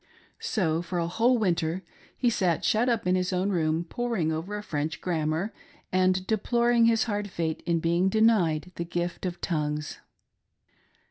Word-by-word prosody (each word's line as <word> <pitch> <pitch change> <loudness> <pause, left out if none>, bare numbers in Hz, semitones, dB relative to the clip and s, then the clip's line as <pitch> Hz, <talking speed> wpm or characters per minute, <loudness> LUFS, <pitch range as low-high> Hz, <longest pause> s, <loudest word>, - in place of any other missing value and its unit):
So, 165 -7 0
for 175 +1 -4
a 170 - +1
whole 230 +8 +2
winter, 175 -3 0 0.3
he 245 -2 +2
sat 180 -7 +1
shut 230 +4 +3
up 230 -5 0
in 180 - +2
his 185 0 0
own 185 +2 0
room 160 -2 +1
poring 205 -3 -1
over 170 +7 -3
a 210 - -6
French 155 -3 -3
grammar, 165 +3 -1 0.4
and 185 0 +2
deploring 235 +3 +2
his 230 -1 +4
hard 205 -2 -2
fate 165 -3 -2
in 170 -1 +2
being 170 +3 +2
denied 190 -7 +2
the 170 - -1
gift 175 +2 -3
of 175 -1 -5
tongues. 150 -3 -2
180 Hz, 160 wpm, -27 LUFS, 165-215 Hz, 0.4 s, his